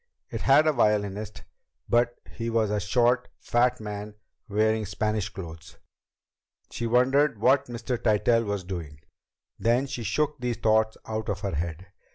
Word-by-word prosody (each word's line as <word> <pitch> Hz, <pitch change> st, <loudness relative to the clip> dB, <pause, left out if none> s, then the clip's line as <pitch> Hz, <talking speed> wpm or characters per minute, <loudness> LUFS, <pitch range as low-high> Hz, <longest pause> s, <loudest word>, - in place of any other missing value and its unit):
It -, -, -4 dB
had 155 Hz, -, +5 dB
a 155 Hz, -, +3 dB
violinist, 105 Hz, -3 st, 0 dB, 0.4 s
but 120 Hz, 0 st, +2 dB, 0.2 s
he 115 Hz, 0 st, -4 dB
was 110 Hz, -2 st, +1 dB
a 105 Hz, -, +1 dB
short, 120 Hz, +4 st, +2 dB
fat 125 Hz, +1 st, +1 dB
man 105 Hz, -1 st, -6 dB, 0.3 s
wearing 110 Hz, +1 st, +2 dB
Spanish 105 Hz, 0 st, -1 dB
clothes. 80 Hz, -5 st, -10 dB, 0.9 s
She 120 Hz, -, -3 dB
wondered 125 Hz, +1 st, +3 dB
what 130 Hz, +5 st, +3 dB
Mr. 120 Hz, 0 st, -4 dB
Tytell 115 Hz, +2 st, +3 dB
was 100 Hz, -3 st, -3 dB
doing. 85 Hz, -6 st, -6 dB, 0.6 s
Then 120 Hz, +4 st, +2 dB
she 130 Hz, -3 st, -5 dB
shook 140 Hz, +8 st, -1 dB
these 125 Hz, -2 st, -2 dB
thoughts 110 Hz, 0 st, +2 dB
out 110 Hz, 0 st, -4 dB
of 95 Hz, -2 st, -2 dB
her 100 Hz, -2 st, -3 dB
head. 85 Hz, +3 st, -3 dB
110 Hz, 150 wpm, -26 LUFS, 100-120 Hz, 0.9 s, had